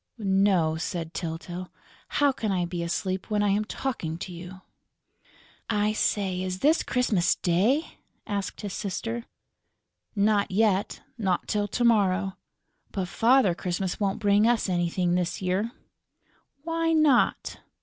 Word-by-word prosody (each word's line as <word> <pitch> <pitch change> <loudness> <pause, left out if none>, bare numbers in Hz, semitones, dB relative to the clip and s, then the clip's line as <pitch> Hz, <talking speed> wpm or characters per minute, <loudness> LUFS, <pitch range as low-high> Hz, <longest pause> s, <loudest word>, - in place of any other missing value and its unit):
"No," 190 -6 +2
said 165 0 -4
Tyltyl. 175 +2 -5 0.4
"How 290 -1 +2
can 225 -5 -3
I 180 -2 +1
be 175 0 -4
asleep, 185 +3 -2
when 210 -1 +1
I'm 205 +1 +2
talking 210 -8 -4
to 180 +1 -7
you?" 180 +2 -9 1.1
"I 210 -1 +1
say, 190 -4 0
is 185 0 -4
this 310 +3 +4
Christmas 220 -8 +1
Day?" 210 - +1 0.3
asked 200 -3 -3
his 205 -2 -5
sister. 225 +4 -4 0.9
"Not 205 0 +2
yet; 200 0 +1 0.2
not 190 -4 0
till 205 -1 0
to 240 +4 -2
morrow. 195 -4 +2 0.6
But 185 -3 -3
Father 235 -1 +4
Christmas 180 +1 -3
won't 200 -1 0
bring 205 0 +3
us 235 -3 +2
anything 175 0 0
this 180 -1 -1
year." 190 +5 -1 0.9
"Why 330 0 0
not?" 305 -6 +2
195 Hz, 130 wpm, -26 LUFS, 180-220 Hz, 1.1 s, this